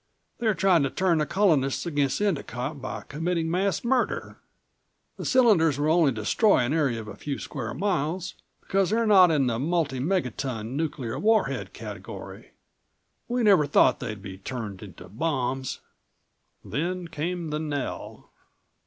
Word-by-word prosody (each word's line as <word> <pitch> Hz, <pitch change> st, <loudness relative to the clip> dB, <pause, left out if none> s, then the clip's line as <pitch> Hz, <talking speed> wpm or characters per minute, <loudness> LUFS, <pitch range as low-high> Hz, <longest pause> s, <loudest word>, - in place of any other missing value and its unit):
They're 220 Hz, -4 st, +1 dB
trying 185 Hz, -4 st, +4 dB
to 135 Hz, -, +1 dB
turn 175 Hz, +1 st, +1 dB
the 150 Hz, -, 0 dB
Colonists 155 Hz, -10 st, +2 dB
against 145 Hz, -1 st, 0 dB
Endicott 140 Hz, -, -2 dB
by 130 Hz, -, -5 dB
committing 165 Hz, +2 st, -1 dB
mass 190 Hz, 0 st, 0 dB
murder. 250 Hz, +1 st, -1 dB, 0.8 s
The -, -, -6 dB
cylinders 200 Hz, -, +4 dB
will 150 Hz, +2 st, +1 dB
only 165 Hz, -5 st, +4 dB
destroy 120 Hz, -, +2 dB
an 120 Hz, +4 st, 0 dB
area 140 Hz, -8 st, +1 dB
of 110 Hz, -, -8 dB
a 105 Hz, -, -8 dB
few 140 Hz, +6 st, -4 dB
square 120 Hz, -6 st, -5 dB
miles, 180 Hz, -2 st, -1 dB, 0.3 s
because 195 Hz, -1 st, +1 dB
they're 230 Hz, +2 st, +1 dB
not 190 Hz, -4 st, +7 dB
in 150 Hz, -4 st, +2 dB
the 115 Hz, -2 st, 0 dB
multiple 145 Hz, -4 st, 0 dB
megaton, 130 Hz, -, -2 dB
nuclear 145 Hz, -7 st, -3 dB
warhead 220 Hz, +1 st, +1 dB
category. -, -, -9 dB, 0.7 s
We 245 Hz, 0 st, 0 dB
never 195 Hz, -9 st, +5 dB
thought 145 Hz, -, +4 dB
they'd 105 Hz, -6 st, -6 dB
be 95 Hz, -2 st, -8 dB
turned 105 Hz, -3 st, -6 dB
into 95 Hz, -5 st, -11 dB
bombs." 130 Hz, -, -2 dB, 0.8 s
Then 175 Hz, +4 st, -3 dB
came 165 Hz, +1 st, -3 dB
the 150 Hz, -, -1 dB
knell. 145 Hz, -3 st, -5 dB
155 Hz, 145 wpm, -26 LUFS, 130-185 Hz, 0.8 s, not